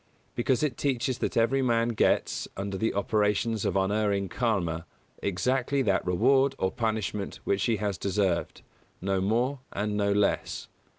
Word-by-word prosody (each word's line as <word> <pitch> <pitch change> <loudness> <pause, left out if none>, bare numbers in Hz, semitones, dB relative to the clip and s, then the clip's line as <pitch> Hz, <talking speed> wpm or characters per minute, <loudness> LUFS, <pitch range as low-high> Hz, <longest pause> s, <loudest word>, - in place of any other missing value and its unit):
Because 125 +3 +1
it 145 -5 0
teaches 130 -2 -1
that - - -2
every 120 +4 +3
man 115 -2 +2
gets, 115 - +1
under 100 0 -3
the 110 +4 -1
operations 105 +1 +1
of - - 0
unerring 100 0 +1
KARMA, 90 -9 -1 0.3
exactly 130 +8 0
that 100 -5 +1
reward 135 +10 +3
or 95 - 0
punishment 110 -3 -2
which 100 -1 0
he 115 - +2
has 100 -4 -2
deserved, 95 -3 -1 0.4
no 95 0 0
more 120 +7 +1
and 105 +1 -2
no 100 -1 +1
less. 100 0 0
105 Hz, 150 wpm, -28 LUFS, 100-120 Hz, 0.4 s, every